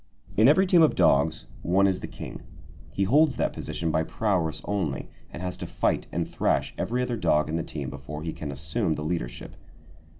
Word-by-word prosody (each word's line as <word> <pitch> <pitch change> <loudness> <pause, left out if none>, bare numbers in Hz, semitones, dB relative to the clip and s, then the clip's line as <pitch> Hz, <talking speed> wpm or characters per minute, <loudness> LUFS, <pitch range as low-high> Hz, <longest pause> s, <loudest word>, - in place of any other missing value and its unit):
In 110 +3 +6
every 160 +7 +6
team 180 -2 +5
of 160 - +5
dogs, 80 -4 +3 0.2
one 95 +6 +3
is 95 -2 +2
the - - -6
king. - - -8 0.5
He 100 - 0
holds 140 +8 +4
that - - 0
position 80 -1 -3
by 80 - +2
prowess 85 -2 0
only, 90 -10 -2 0.2
and 85 - -7
has 90 0 -3
to - - -6
fight - - 0
and - - -1
thrash - - 0
every 125 +3 -1
other 125 -2 -2
dog 80 -6 +2
in 80 - -1
the 85 - 0
team 70 -4 -5
before 70 +3 -7
he 80 - -3
can 75 -2 -5
assume 75 +2 -1
the 75 - -5
leadership. 80 -7 -4
85 Hz, 200 wpm, -26 LUFS, 75-105 Hz, 0.5 s, In